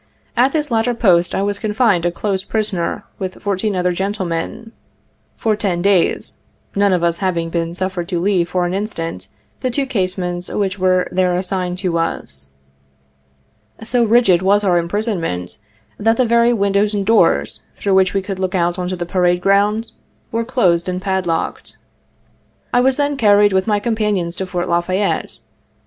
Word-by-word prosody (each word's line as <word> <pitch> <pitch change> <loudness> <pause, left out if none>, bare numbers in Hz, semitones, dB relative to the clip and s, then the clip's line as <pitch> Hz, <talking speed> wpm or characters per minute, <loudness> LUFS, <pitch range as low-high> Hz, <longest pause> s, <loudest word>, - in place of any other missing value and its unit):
At 255 +3 +3
this 300 -3 -1
latter 230 +1 +1
post 180 -7 +3
I 195 - 0
was 200 0 -2
confined 210 -5 +1
a - - 0
close 190 +2 -2
prisoner, 205 -5 -2 0.2
with 185 -1 -5
fourteen 200 +1 -1
other 180 0 +1
gentlemen, 190 +2 -3 0.7
for 220 -2 +1
ten 185 -5 -1
days, 195 -3 +1 0.4
none 200 0 +3
of 180 -2 +1
us 170 -1 +1
having 170 -4 -1
been 170 0 -2
suffered 185 -1 -2
to 175 -3 -1
leave 180 -2 +1
for 180 -1 0
an 175 - -2
instant 165 - -4 0.3
the 255 - -1
two 275 +3 0
casemates 185 -6 -2
which 200 -1 -2
were 185 -1 +2
there 180 -1 +1
assigned 180 -1 -2
to 180 -3 -1
us. 70 - -4 1.3
So 240 +2 +1
rigid 220 -6 +4
was 200 +2 +3
our 180 -3 +3
imprisonment, 170 - -3 0.4
that 225 +2 +2
the 255 - +3
very 235 +1 +4
windows 200 -1 +1
and 200 -1 -1
doors, 225 +2 +2
through 200 - -1
which 190 0 +3
we 195 - 0
could 195 -1 -5
look 185 0 -1
out 175 0 0
on 180 - -2
the 180 -1 -3
pa 185 +2 -2
rade 175 0 +3
ground, 205 +4 +1 0.4
were 230 +1 -1
closed 185 -8 +1
and 180 0 -2
padlocked. 185 -4 -2 1.0
I 245 - +4
was 265 +1 +2
then 285 -1 0
carried, 205 -3 +4
with 190 +1 +1
my 210 -1 +2
companions, 210 -6 -1
to 190 - -3
Fort 180 -1 -3
La 170 0 +2
Fayette. 185 +3 -2
190 Hz, 170 wpm, -18 LUFS, 175-210 Hz, 1.3 s, rigid